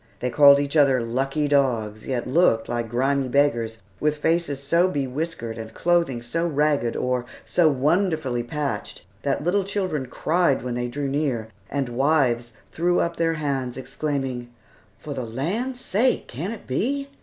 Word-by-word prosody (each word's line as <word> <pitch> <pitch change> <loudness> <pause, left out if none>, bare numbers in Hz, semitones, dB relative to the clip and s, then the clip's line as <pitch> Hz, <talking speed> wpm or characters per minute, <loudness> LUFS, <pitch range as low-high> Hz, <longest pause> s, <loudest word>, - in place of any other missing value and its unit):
They 125 - -2
called 140 +1 +7
each 140 +1 -2
other 140 -4 +5
"lucky 135 +5 -1
dogs," 120 -7 +1
yet 125 -3 -1
looked 125 -6 +3
like 120 -1 -2
grimy 135 +3 +1
beggars, 120 -5 +1 0.2
with 150 0 +1
faces 160 -2 0
so 170 +6 +3
bewhiskered, 135 -5 -3
and 110 0 -8
clothing 170 -9 +1
so 165 +8 -1
ragged, 145 -6 +1
or 125 -1 -1 0.2
so 170 -3 +3
wonderfully 150 -2 +1
patched, 145 +4 -4 0.2
that 140 +1 -1
little 190 +4 +2
children 185 -9 -2
cried 160 0 +1
when 125 -1 -3
they 120 0 -2
drew 140 +3 -3
near, 135 -6 -1 0.2
and 140 -1 -1
wives 120 -2 +1 0.2
threw 175 +2 +1
up 170 0 -1
their 165 0 +1
hands, 135 -5 -2
exclaiming, 135 -2 -3 0.5
"For 150 -2 -7
the 130 -2 -4
land's 190 - -3
sake! 250 +1 +1
can 160 - -4
it 230 - -8
be?" 275 - -1
140 Hz, 155 wpm, -24 LUFS, 125-160 Hz, 0.5 s, called